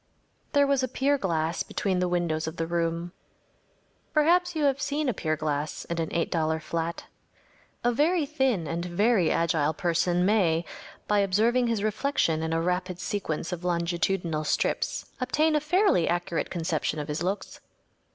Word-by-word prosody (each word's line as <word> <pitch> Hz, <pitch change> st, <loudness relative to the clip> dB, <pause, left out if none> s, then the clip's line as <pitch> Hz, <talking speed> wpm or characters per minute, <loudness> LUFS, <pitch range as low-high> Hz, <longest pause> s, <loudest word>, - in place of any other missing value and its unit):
There 285 Hz, -1 st, +5 dB
was 280 Hz, -1 st, +2 dB
a 255 Hz, -, 0 dB
pier 275 Hz, +3 st, +1 dB
glass 165 Hz, -4 st, -1 dB
between 190 Hz, -3 st, -1 dB
the 180 Hz, -, +1 dB
windows 170 Hz, -3 st, -1 dB
of 160 Hz, -, -5 dB
the 165 Hz, -, -1 dB
room. 170 Hz, 0 st, -1 dB, 1.0 s
Perhaps 350 Hz, +3 st, +3 dB
you 310 Hz, -, 0 dB
have 280 Hz, -1 st, +2 dB
seen 290 Hz, +1 st, -1 dB
a 250 Hz, -, +1 dB
pier 155 Hz, -5 st, -1 dB
glass 150 Hz, -1 st, -3 dB
in 170 Hz, 0 st, -3 dB
an 160 Hz, -, -2 dB
$8 160 Hz, -1 st, 0 dB
flat. 165 Hz, +1 st, -3 dB, 0.8 s
A 240 Hz, -, +3 dB
very 310 Hz, +6 st, +2 dB
thin 265 Hz, -, 0 dB
and 170 Hz, +2 st, -3 dB
very 185 Hz, +1 st, +2 dB
agile 160 Hz, -2 st, +1 dB
person 175 Hz, +1 st, +1 dB
may, 175 Hz, -5 st, +2 dB, 0.4 s
by 210 Hz, 0 st, +3 dB
observing 225 Hz, +6 st, +2 dB
his 225 Hz, -3 st, 0 dB
reflection 215 Hz, -, +1 dB
in 160 Hz, 0 st, -2 dB
a 165 Hz, -, +1 dB
rapid 180 Hz, 0 st, -1 dB
sequence 180 Hz, -5 st, -3 dB
of 180 Hz, -1 st, -5 dB
longitudinal 170 Hz, -1 st, 0 dB
strips, 150 Hz, -, -1 dB
obtain 305 Hz, +5 st, +2 dB
a -, -, +4 dB
fairly 315 Hz, -, +3 dB
accurate 175 Hz, 0 st, -1 dB
conception 160 Hz, -3 st, -1 dB
of 150 Hz, -1 st, -4 dB
his 150 Hz, +1 st, -3 dB
looks. 190 Hz, +4 st, -3 dB
180 Hz, 160 wpm, -27 LUFS, 165-250 Hz, 1.0 s, There